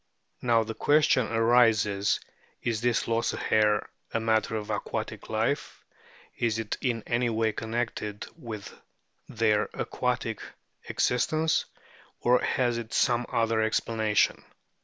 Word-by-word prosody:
Now 115 -2 +3
the 110 +1 -5
question 145 -3 +3
arises, 115 -3 +3 0.4
Is 115 -2 -1
this 120 -1 +1
loss 115 0 0
of - - -5
hair 105 -1 +2 0.2
a - - 0
matter 110 -1 +1
of 105 -1 -4
aquatic - - -4
life; - - -2 0.5
is 115 -2 +1
it 110 -2 -2
in 120 -4 -1
any 120 0 +1
way 110 -1 +1
connected 110 -2 -3
with 115 -10 -8 0.6
their 110 -2 +1
aquatic - - -2 0.5
existence; 155 +6 +1 0.5
or 125 +1 +4
has 120 -2 +1
it 115 -1 -6
some 120 0 +2
other 115 -1 +1
explanation 110 -1 +1
115 Hz, 120 wpm, -28 LUFS, 110-120 Hz, 0.6 s, or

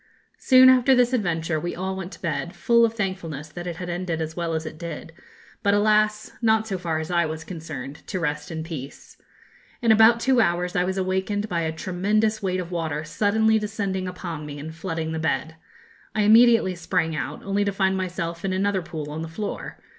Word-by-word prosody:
Soon 260 0 +7
after 260 +1 +6
this 250 0 +3
adventure 165 -7 0
we 175 +3 -4
all 190 +2 -3
went 190 -1 -6
to - - -13
bed, 170 +1 -2
full 235 +7 +4
of 230 0 -2
thankfulness 175 -8 -4
that 175 +3 -7
it 175 - -4
had 180 +2 -6
ended 175 -1 -3
as 160 0 -4
well 170 -2 -2
as 160 0 -3
it 155 0 -8
did; 165 -1 -7 0.5
but, 200 0 +3
alas, 215 0 +2
not, 220 -1 +3
so 190 -3 -3
far 165 -3 -1
as 160 +2 -4
I 170 -1 +2
was 160 +1 -5
concerned, 150 -5 -7
to 185 - -3
rest 150 -3 -2
in 160 -1 -4
peace. 150 -5 -8 0.6
In 230 -2 +3
about 225 +2 +6
two 255 0 +3
hours 175 -2 0
I 180 - +2
was 190 +1 -2
awakened 190 +2 -1
by 170 -4 -1
a 160 -1 -1
tremendous 210 +6 0
weight 185 -2 -1
of 180 -1 -5
water 160 -3 -2
suddenly 220 +6 +2
descending 200 -3 -3
upon 175 -4 -6
me 145 -1 -7
and 155 +2 -7
flooding 165 -2 -4
the 160 - -3
bed. 160 0 -1 0.6
I 215 - +2
immediately 225 -2 +6
sprang 165 -2 -1
out, 150 - -4
only 200 +1 0
to 200 - 0
find 190 -1 +1
myself 170 -3 -3
in 190 -1 -1
another 195 0 +1
pool 155 -3 -6
on 155 +1 -4
the 165 - -4
floor. 200 +6 -5
180 Hz, 205 wpm, -24 LUFS, 160-205 Hz, 0.6 s, Soon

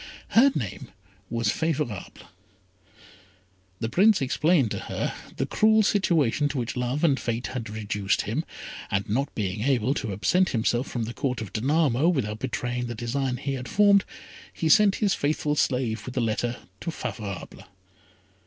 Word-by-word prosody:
Her 265 +5 +6
name 105 -9 -4 0.4
was 115 0 0
Favourable. 150 - -2 1.7
The 115 - -1
Prince 205 - +5
explained 140 - +2
to - - -2
her - - -3 0.2
the - - 0
cruel 220 0 +4
situation 155 - +2
to 145 - -4
which 120 -2 -2
love 125 +4 -1
and 145 -5 +3
fate 120 +1 -2
had 115 -4 -4
reduced 105 -2 -1
him, - - -2 0.5
and 100 +2 -1
not 135 +7 -1
being 100 -1 -2
able 130 0 +2
to 115 -7 -3
absent 180 - +2
himself 120 +2 0
from 120 - -3
the 115 +2 -5
Court 130 -1 -2
of 110 -4 -7
Danamo 140 +4 +2
without 110 -10 -1
betraying 125 -1 -2
the 120 - -5
design 125 +3 -2
he 140 +2 -3
had 130 -2 -5
formed, 200 - +5 0.5
he 160 - -1
sent 210 0 +6
his 205 -3 +1
faithful 150 0 0
slave 125 -6 0
with 125 - -6
the - - +1
letter 120 +2 -1 0.2
to 170 - -4
Favourable. 105 - -6
125 Hz, 160 wpm, -26 LUFS, 115-155 Hz, 1.7 s, Her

